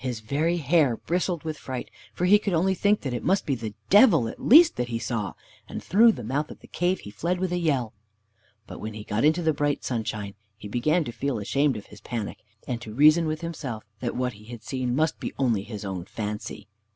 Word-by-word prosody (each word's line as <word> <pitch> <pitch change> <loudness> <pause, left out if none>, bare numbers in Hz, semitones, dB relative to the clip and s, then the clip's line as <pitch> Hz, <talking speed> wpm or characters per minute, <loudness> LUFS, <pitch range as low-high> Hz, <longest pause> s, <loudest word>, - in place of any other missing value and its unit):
His 125 -4 -3
very 155 +9 0
hair 150 -5 +2
bristled 175 -1 -2
with 155 -1 -5
fright, 130 -2 -6 0.2
for 180 - -2
he 205 +3 +6
could 200 -3 -2
only 190 +4 +2
think 205 +3 +2
that 130 -4 -3
it 120 - -3
must 190 +2 +1
be 140 - 0
the 110 -4 -5 0.2
Devil 205 - +6
at - - -8
least 320 +7 +7
that 125 - -1
he 115 -1 -2
saw; 115 -3 -3 0.4
and - - -6
through 225 +4 +6
the 125 - -7
mouth 140 +7 -2
of - - -11
the - - -16
cave 180 +2 -1
he 105 - -9
fled 170 - -2
with 185 -1 -1
a 180 - 0
yell. 135 -9 0 0.7
But - - -9
when 110 0 -6
he 105 - -7
got 105 +3 -1
into 160 +3 +3
the 160 -1 +2
bright 145 0 -1
sunshine 110 -4 -3 0.2
he 105 - -9
began 150 - +1
to 120 - -5
feel 130 +2 -2
ashamed 135 +5 +1
of 105 - -9
his - - -15
panic, 115 -4 -5 0.3
and 125 -2 -3
to 110 -2 -8
reason 155 +4 +6
with 155 +1 -3
himself 140 -10 -5 0.2
that 120 0 -3
what 125 -1 -1
he 105 +1 -15
had 115 -1 -10
seen 125 0 -2
must 155 +2 +1
be - - -5
only 120 -7 +1
his 105 0 -7
own 95 -3 -4
fancy. 105 0 -6
130 Hz, 235 wpm, -26 LUFS, 110-165 Hz, 0.7 s, least